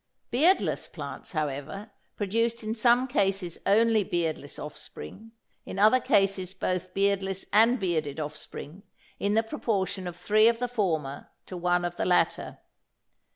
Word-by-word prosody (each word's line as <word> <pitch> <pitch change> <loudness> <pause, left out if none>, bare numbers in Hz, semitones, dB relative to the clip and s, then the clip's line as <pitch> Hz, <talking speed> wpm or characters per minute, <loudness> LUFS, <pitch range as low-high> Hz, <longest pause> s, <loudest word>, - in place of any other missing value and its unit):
Beardless 320 +11 +2
plants, - - -8
however, 155 +7 -4 0.2
produced 230 +3 -1
in 215 +1 -2
some 240 +3 +3
cases 195 - 0
only 220 +1 +4
beardless 160 -5 -2
offspring, 215 - -9 0.3
in - - -7
other 215 +6 +5
cases 195 -4 +1
both 185 -1 -3
beardless 195 -1 0
and 230 +4 +5
bearded 160 -6 -1
offspring 155 +3 -7 0.4
in 205 +1 +1
the 225 - +4
proportion 200 -7 -2
of 175 - -6
three 215 +1 +4
of 230 0 +3
the 245 +1 -1
former 160 - -2 0.2
to 185 - -8
one 175 0 +1
of 175 0 -4
the - - -1
latter. 180 - +1
195 Hz, 140 wpm, -27 LUFS, 175-225 Hz, 0.4 s, other